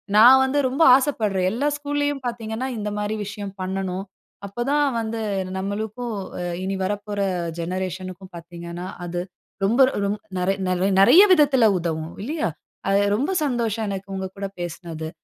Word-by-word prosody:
நான் 245 +5 +9
வந்து 275 +2 +1
ரொம்ப 275 +6 +2
ஆசைப்படுறேன். 215 -9 +1
எல்லா 255 +7 0
ஸ்கூல்லேயும் 290 -1 -1
பார்த்தீங்கன்னா, 230 +1 -3
இந்த 210 -1 -3
மாரி 210 +1 -1
விஷயம் 205 0 -6
பண்ணணும். 190 0 -3 0.4
அப்ப 220 +5 -4
தான் 295 0 +3
வந்து 225 0 -3 0.4
நம்மளுக்கும், 215 +4 -3 0.5
இனி 195 +1 -2
வரப்போற 205 +1 -3 0.4
ஜெனரேஷனுக்கும் 185 +1 -5
பார்த்தீங்கன்னா, 170 +1 -8 0.2
அது 175 0 -3 0.4
ரொம்ப 230 +6 +1 0.3
ரொம் 205 +1 -1 0.2
நெறை 185 +2 +1
நெறை 185 +2 +1
நெறைய 260 - +8
விதத்துல 270 -8 +5
உதவும். 160 -1 -3
இல்லையா? 300 - -1 0.4
அது 200 +1 +4
ரொம்ப 280 - 0
சந்தோஷம் 230 -4 -1
எனக்கு, 195 0 -5
உங்கக்கூட 190 +1 -4
பேசனது. 165 -2 -5
205 Hz, 135 wpm, -23 LUFS, 185-240 Hz, 0.5 s, நான்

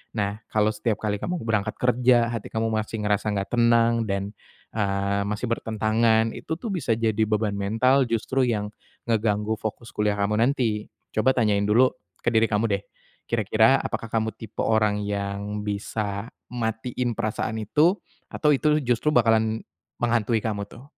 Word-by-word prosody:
Nah, 105 0 -2
kalau 110 0 +2
setiap 110 -1 -1
kali 105 -2 -1
kamu 180 0 -2
berangkat 110 -1 -1
kerja, 125 -1 +3
hati 115 -3 -4
kamu 115 0 0
masih 110 0 -2
ngerasa 105 +1 +1
nggak 100 -1 -3
tenang 115 -1 +4
dan, 100 +2 -2 0.4
eee, 100 -1 0
masih 105 +4 -2
bertentangan, 110 0 +1
itu 160 - -4
tuh 230 - -5
bisa 135 -10 0
jadi 110 -1 +1
beban 105 -1 0
mental 115 +7 +3
justru 115 +4 0
yang 105 -3 -1 0.4
ngeganggu 110 -1 +1
fokus 110 +2 -6
kuliah 105 -1 +1
kamu 105 +2 +1
nanti. 120 -5 0 0.3
Coba 115 +5 +4
tanyain 105 -4 +2
dulu 115 +5 +4 0.3
ke - - -11
diri 110 0 +5
kamu 105 +1 +1
deh, 100 0 0 0.5
kira-kira 110 +3 +3
apakah 115 - -4
kamu 110 -1 0
tipe 110 -1 -11
orang 110 -2 +2
yang 100 0 -3
bisa 100 0 -3 0.2
matiin 120 +1 -2
perasaan 110 0 -2
itu? 155 - +3 0.3
Atau 150 - +2
itu 150 +2 +2
justru 125 +4 +1
bakalan 110 -2 +3 0.4
menghantui 115 -1 +1
kamu 105 -2 -2
tuh? 120 - -13
110 Hz, 155 wpm, -25 LUFS, 105-115 Hz, 0.5 s, diri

